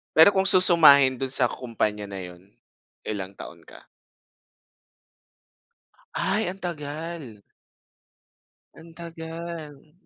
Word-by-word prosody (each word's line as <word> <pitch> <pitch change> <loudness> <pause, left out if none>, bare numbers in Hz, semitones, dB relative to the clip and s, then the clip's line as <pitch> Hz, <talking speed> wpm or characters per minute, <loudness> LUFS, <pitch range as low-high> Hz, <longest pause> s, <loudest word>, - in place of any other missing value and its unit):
Pero 160 +5 +7
kung 190 -1 +1
susumahin 150 -9 +6
do'n 135 -1 -3
sa 125 -3 +2
kumpanya 105 -4 -3
na 100 -1 -7
yun, 90 +2 -13 0.6
ilang 100 -2 -5
taon - - -11
ka? - - -14 2.3
Ay, 215 -2 0
ang 190 - -13
tagal. 155 - -7 1.4
Ang 165 +1 -15
tagal. 165 -3 -9
150 Hz, 95 wpm, -24 LUFS, 115-170 Hz, 2.3 s, Pero